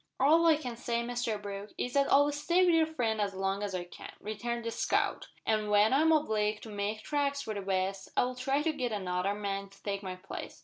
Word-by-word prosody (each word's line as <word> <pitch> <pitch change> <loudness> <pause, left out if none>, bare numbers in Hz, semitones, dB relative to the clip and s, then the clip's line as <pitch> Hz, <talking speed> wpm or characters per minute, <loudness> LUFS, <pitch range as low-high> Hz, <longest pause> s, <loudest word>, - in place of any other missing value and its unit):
"All 320 +5 +5
I 320 - +7
can 250 -6 -5
say, 235 -1 -1
Mr 240 -3 -2
Brooke, 200 0 -7
is 250 - -2
that 280 -1 +2
I'll 285 +1 +5
stay 340 +6 +2
wi' 355 - +5
your 325 -1 +4
friend 230 -9 -1
as 200 -2 -1
long 195 +1 -1
as 200 -2 -2
I 180 - -2
can," 175 - -10
returned 235 +3 -4
the 230 - -1
scout, - - 0 0.2
"an' 215 -1 +1
when 210 +3 +5
I'm 315 +4 +4
obleeged 215 -9 +1
to 225 - -8
make 210 +1 -3
tracks 280 -1 0
for 220 - -4
the 200 - -4
west, 190 0 -1
I'll 250 +1 +2
try 270 +3 0
to 320 0 +1
git 255 -5 -2
another 190 -1 -1
man 200 -1 -3
to 195 - -21
take 200 -1 -2
my 185 -2 -5
place. 185 +1 -8
220 Hz, 230 wpm, -31 LUFS, 200-275 Hz, 0.2 s, I